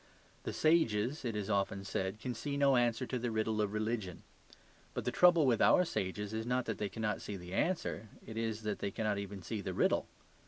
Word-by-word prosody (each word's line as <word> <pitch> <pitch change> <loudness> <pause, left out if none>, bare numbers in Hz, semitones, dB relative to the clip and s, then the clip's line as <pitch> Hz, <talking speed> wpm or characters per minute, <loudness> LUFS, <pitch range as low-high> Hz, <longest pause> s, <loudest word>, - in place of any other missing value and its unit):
The - - -1
sages, 145 -5 +2
it 115 -3 -2
is 105 -2 -2
often 100 -1 0
said, 95 +1 -2
can 125 +2 -3
see 140 +4 -3
no 140 -1 +5
answer 120 0 +2
to 125 0 -3
the 120 0 -1
riddle 110 -1 0
of 105 -1 0
religion. 110 -4 -2 0.7
But - - -3
the - - +1
trouble 175 -4 +6
with 120 -4 +3
our 180 - +6
sages 105 - -3
is 110 +1 -3
not 125 0 +1
that 110 - -3
they 105 - -1
cannot 105 0 -2
see 100 - -5
the 90 0 -9
answer; 160 - -1 0.2
it 110 - -8
is 110 -1 -2
that 105 -1 -2
they - - -1
cannot 105 0 -1
even 100 -1 -6
see 110 +3 -3
the 95 -3 -4
riddle. - - +2
110 Hz, 220 wpm, -34 LUFS, 100-125 Hz, 0.7 s, trouble